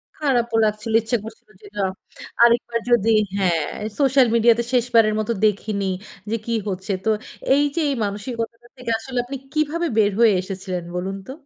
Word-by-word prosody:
খারাপও 240 Hz, -6 st, 0 dB
লাগছিল 215 Hz, +1 st, -2 dB
ইচ্ছা 225 Hz, +2 st, 0 dB
করছিল 220 Hz, 0 st, -12 dB
যে 210 Hz, -, -13 dB
না, 200 Hz, -, +1 dB, 0.6 s
আরেকবার 235 Hz, 0 st, +3 dB
যদি 225 Hz, -2 st, +4 dB, 0.3 s
হ্যা 195 Hz, -2 st, +2 dB, 0.5 s
সোশ্যাল 270 Hz, -2 st, +4 dB
মিডিয়াতে 235 Hz, 0 st, +4 dB
শেষবারের 230 Hz, -3 st, +3 dB
মতো 215 Hz, +1 st, -1 dB
দেখিনি 205 Hz, -1 st, 0 dB, 0.4 s
যে 225 Hz, -, 0 dB
কি 235 Hz, -, -2 dB, 0.2 s
হচ্ছে। 190 Hz, +1 st, -4 dB
তো -, -, +2 dB, 0.5 s
এই 285 Hz, -, +3 dB
যে 335 Hz, -, +1 dB
এই 280 Hz, -, 0 dB
মানসিকতা 230 Hz, +3 st, -5 dB
থেকে 250 Hz, -2 st, -4 dB
আসলে 250 Hz, +3 st, -7 dB
আপনি 270 Hz, +2 st, -5 dB, 0.2 s
কিভাবে 310 Hz, +3 st, 0 dB
বের 210 Hz, -2 st, +4 dB
হয়ে 230 Hz, -3 st, +6 dB
এসেছিলেন 185 Hz, -1 st, -5 dB
বলুন 190 Hz, +2 st, -3 dB
তো? -, -, -6 dB
230 Hz, 160 wpm, -22 LUFS, 205-245 Hz, 0.6 s, হয়ে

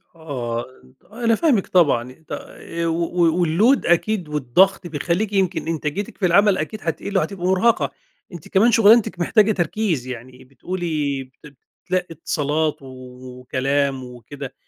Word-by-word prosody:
آه، 125 Hz, -7 st, -4 dB, 0.5 s
أنا 230 Hz, 0 st, +1 dB
فاهمِك 250 Hz, -, +2 dB
طبعًا، 135 Hz, -9 st, +2 dB, 0.2 s
ط -, -, -16 dB
آآ 170 Hz, 0 st, -6 dB
و 170 Hz, +1 st, 0 dB, 0.2 s
و 175 Hz, -, +3 dB
الload 215 Hz, -, +3 dB
أكيد 175 Hz, 0 st, +1 dB
والضغط 150 Hz, +7 st, +2 dB
بيخلّيكِ 175 Hz, +7 st, -2 dB
يمكن 190 Hz, -4 st, 0 dB
إنتاجيتِك 165 Hz, +4 st, -3 dB
في 195 Hz, -, 0 dB
العمل 200 Hz, +3 st, +4 dB
أكيد 185 Hz, +8 st, -4 dB
هتقل 190 Hz, +4 st, -2 dB
وهتبقي 190 Hz, -2 st, -2 dB
مرهقة. 190 Hz, +5 st, +2 dB, 0.4 s
أنتِ 170 Hz, -, -10 dB
كمان 220 Hz, +5 st, +3 dB
شغلانتك 220 Hz, -3 st, +5 dB
محتاجة 215 Hz, +4 st, +3 dB
تركيز 175 Hz, -, -1 dB
يعني 125 Hz, +1 st, -9 dB
بتقولي 145 Hz, 0 st, -3 dB
بت 135 Hz, +2 st, -17 dB, 0.3 s
بتتلقّي 185 Hz, 0 st, -1 dB
اتصالات 155 Hz, -1 st, -1 dB
وكلام 130 Hz, +1 st, -3 dB
وكده، 125 Hz, +2 st, -9 dB
165 Hz, 130 wpm, -21 LUFS, 135-195 Hz, 0.5 s, شغلانتك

